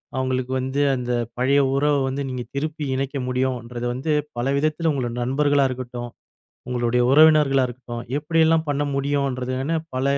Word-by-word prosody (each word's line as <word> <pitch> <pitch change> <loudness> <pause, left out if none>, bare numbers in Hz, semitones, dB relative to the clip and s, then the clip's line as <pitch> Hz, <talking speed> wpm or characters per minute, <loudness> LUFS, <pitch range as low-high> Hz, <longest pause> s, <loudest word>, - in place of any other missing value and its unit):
அவுங்களுக்கு 130 -1 -1
வந்து 130 +2 -1
அந்த 125 -1 -3 0.3
பழைய 135 +3 +3
உறவ 145 +1 +2
வந்து 135 +2 -2
நீங்க 125 -1 -4
திருப்பி 155 +2 -3
இணைக்க 135 +1 -2
முடியும்ன்றது 125 -2 -2
வந்து 135 +6 -2 0.3
பல 120 - -1
விதத்துல 155 +2 +1
உங்கள 130 -4 -2
நண்பர்களா 140 +2 +2
இருக்கட்டும், 125 -1 -6 0.6
உங்களுடைய 125 0 +1
உறவினர்களா 150 -3 +6
இருக்கட்டும் 120 -1 -7
எப்டியெல்லாம் 160 +1 +2
பண்ண 145 0 0
முடியுன்றதுன்னு 135 +1 -1 0.2
பல 130 - 0
130 Hz, 135 wpm, -23 LUFS, 125-145 Hz, 0.6 s, உறவினர்களா